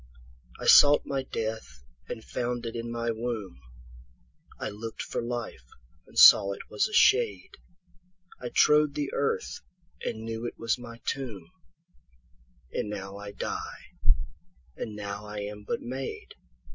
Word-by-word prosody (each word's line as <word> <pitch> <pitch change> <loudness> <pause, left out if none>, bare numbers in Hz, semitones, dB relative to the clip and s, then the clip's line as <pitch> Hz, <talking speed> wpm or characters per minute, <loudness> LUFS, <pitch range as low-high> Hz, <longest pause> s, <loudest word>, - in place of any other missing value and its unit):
13I - - -4
sought 145 0 +8
my 135 -1 -1
death 110 - -5 0.3
and 110 - -5
found 120 -1 -3
it 115 0 -4
in 115 0 -4
my 115 0 -1
womb,14I - - -8
lookt 110 +1 -6
for - - -3
life 115 - -5 0.4
and - - -14
saw 100 0 +9
it - - -11
was 105 - +2
a - - -11
shade,15I 180 - -1
trode 150 -1 +5
the 145 -2 -2
earth 140 - -1 0.4
and 110 -1 -3
knew 115 +1 -3
it - - -8
was 115 +1 0
my 115 -1 -9
tomb,16And 65 - -8
now 100 -1 -6
I 100 0 -7
die, 100 - -5 0.8
and 110 -2 -5
now 100 0 -5
I 105 0 -5
am 105 0 -6
but - - -1
made. 130 +2 -5
115 Hz, 135 wpm, -28 LUFS, 100-130 Hz, 0.8 s, saw